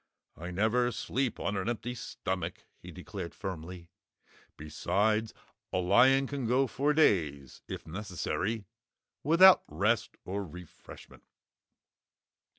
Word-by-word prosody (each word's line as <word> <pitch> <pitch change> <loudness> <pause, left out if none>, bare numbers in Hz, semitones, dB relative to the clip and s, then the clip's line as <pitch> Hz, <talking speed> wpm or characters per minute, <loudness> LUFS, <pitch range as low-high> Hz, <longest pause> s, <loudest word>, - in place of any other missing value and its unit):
"I 85 +3 -7
never 110 +7 +1
sleep 125 +1 -2
on 100 - -2
an 95 +3 -1
empty 120 +1 -3
stomach," 95 -7 -5 0.2
he 90 - -12
declared 90 0 -7
firmly. 90 -2 -7 0.7
"Besides, 105 +8 0 0.4
a - - -1
lion 130 +9 +5
can 135 -3 -4
go 130 +3 +3
for 140 +4 0
days 75 - +1
if - - -7
necessary 100 +4 -3 0.6
without 180 +5 +7
rest 100 +8 0
or 100 +2 -3
refreshment." 90 -1 -12
100 Hz, 110 wpm, -30 LUFS, 90-120 Hz, 0.7 s, without